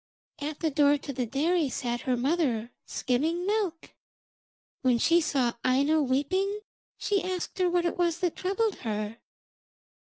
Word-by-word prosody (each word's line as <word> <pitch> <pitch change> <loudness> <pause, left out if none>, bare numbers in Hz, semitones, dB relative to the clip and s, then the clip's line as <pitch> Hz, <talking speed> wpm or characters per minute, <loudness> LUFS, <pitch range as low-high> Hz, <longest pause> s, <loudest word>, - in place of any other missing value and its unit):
At 295 +1 -4
the 320 -2 +1
door 285 0 +4
of 290 - -2
the 250 -2 -2
dairy 310 +4 +1
sat 240 -1 -2
her 255 -2 0
mother, 250 -4 0 0.2
skimming 320 +8 0
milk. 400 -5 -1 0.9
When 255 -2 +3
she 335 +8 +4
saw 265 -6 +1
Aino 280 +5 +3
weeping 370 +10 0 0.4
she 400 -2 +1
asked 370 +1 -4
her 365 -1 +3
what 350 0 +1
it 345 - -1
was 340 -1 +2
that 355 -3 0
troubled 395 +3 0
her. 215 -1 -4
305 Hz, 150 wpm, -28 LUFS, 255-355 Hz, 0.9 s, door